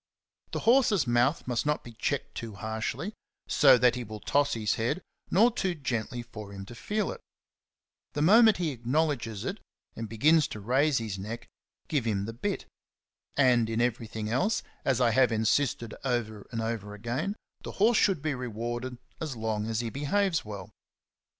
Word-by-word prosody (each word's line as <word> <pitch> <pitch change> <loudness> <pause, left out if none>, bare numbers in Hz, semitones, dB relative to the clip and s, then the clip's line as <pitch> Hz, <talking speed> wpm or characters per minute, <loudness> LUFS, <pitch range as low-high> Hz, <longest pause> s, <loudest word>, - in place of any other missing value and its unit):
The - - -3
horse's 230 - +4
mouth 120 +5 +2
must 120 -2 0
not 150 0 0
be 120 - -10
checked 120 +4 -2
too 115 -3 -6
harshly, 110 - -3 0.3
so 135 -3 +6
that 125 0 +4
he 125 0 -4
will 110 -1 -8
toss 145 +4 +1
his 110 -2 0
head, 115 +10 0 0.3
nor 225 +6 +5
too 190 -6 -1
gently 120 -4 -3
for 105 -4 -9
him 95 -1 -7
to 110 - -10
feel 210 - -2
it. - - -9 0.9
The 145 - 0
moment 220 +4 +7
he 170 -4 0
acknowledges 125 -4 -1
it - - -3 0.4
and 115 -1 -5
begins 150 +7 +4
to 105 - -7
raise 135 +7 +2
his 110 -4 -3
neck, 110 +5 -6 0.4
give 140 -6 0
him 100 -3 0
the 115 - -5
bit. 195 - -3 0.7
And 125 -5 +4
in 115 0 -1
everything 115 -2 -1
else, 130 - +1 0.2
as 130 -3 +2
I 120 -2 +4
have 125 +1 +4
insisted 115 +1 +1
over 115 -5 -2
and 115 -1 -3
over 105 -3 -3
again, 120 - -2 0.3
the - - -7
horse 220 +3 +4
should 185 -8 +2
be 155 -2 0
rewarded 120 0 -4 0.2
as 155 -5 -4
long 110 -1 -2
as 115 0 -1
he 115 -2 -4
behaves 165 - +1
well. 105 -2 -8
120 Hz, 175 wpm, -29 LUFS, 110-150 Hz, 0.9 s, moment